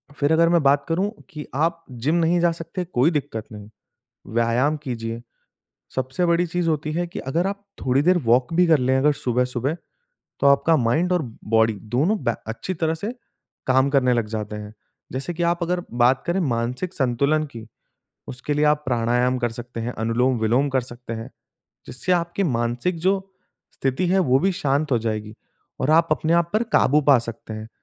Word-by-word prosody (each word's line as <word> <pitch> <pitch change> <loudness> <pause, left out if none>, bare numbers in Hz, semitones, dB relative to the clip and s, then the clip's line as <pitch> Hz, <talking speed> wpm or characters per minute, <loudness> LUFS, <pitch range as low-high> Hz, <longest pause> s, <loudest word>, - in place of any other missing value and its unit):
फिर 145 +2 +1
अगर 165 +1 +4
मैं 170 -2 +3
बात 140 0 +3
करूँ 190 +5 0 0.2
कि 150 -1 -8
आप 165 +2 0
जिम 125 +7 -1
नहीं 170 +1 +2
जा 170 0 +3
सकते, 165 +2 -5
कोई 160 -1 +2
दिक्कत 115 -7 -3
नहीं, 105 -1 -10 0.7
व्यायाम 120 +6 +2
कीजिए। 115 -3 -5 0.7
सबसे 130 +7 -1
बड़ी 170 +1 +2
चीज़ 170 0 -1
होती 155 0 -1
हैं 175 +1 -1
कि - - -7
अगर 165 +8 -1
आप 200 0 -5 0.2
थोड़ी 130 +2 +3
देर 180 +4 +4
वॉक 125 +6 +3
भी 180 +2 +4
कर 160 -2 +5
लें, 130 +1 +2
अगर 150 +3 +4
सुबह-सुबह 125 +3 -1 0.6
तो - - +3
आपका 140 +4 +5
माइंड 155 +8 +1
और 175 -3 +2 0.3
बॉडी 110 0 +4 0.2
दोनों 195 +10 +2
बै 120 - +1
अच्छी 150 +11 -4
तरह 160 -1 0
से 205 +8 -4 0.5
काम 130 +1 +3
करने 130 -3 +3
लग 120 -3 +1
जाते 105 -1 -4
हैं। 105 0 -8 0.4
जैसे 135 +7 -4
कि 175 - -3
आप 170 +1 +1
अगर 175 +1 -1 0.2
बात 130 +2 +4
करें 175 +3 0
मानसिक 125 +5 -2
संतुलन 140 +4 +1
की, 115 -5 -10 0.6
उसके 130 +4 -3
लिए 150 +1 +2
आप 150 0 +3
प्राणायाम 125 +1 +1
कर 120 -2 -1
सकते 120 0 -7
हैं, 120 +2 -3
अनुलोम-विलोम 120 +3 +1
कर 130 -1 +2
सकते 120 -1 -9
हैं, 115 +3 -6 0.6
जिससे 175 +9 -2
आपकी 175 +2 0
मानसिक 120 +3 -1
जो 190 +3 +2 0.6
स्थिति 135 +7 -1
है 190 +1 +3
वो 130 -7 +3
भी 195 +2 +2
शांत 145 -2 0
हो 120 - +4
जाएगी 110 -1 -3 0.5
और 130 - +1
आप 165 +1 +4
अपने 160 +1 0
आप 170 0 +2
पर 215 +2 +2
काबू 150 +3 +4
पा 135 -3 +7
सकते 115 -1 -7
हैं। 110 +1 -7
140 Hz, 190 wpm, -23 LUFS, 120-170 Hz, 0.7 s, पा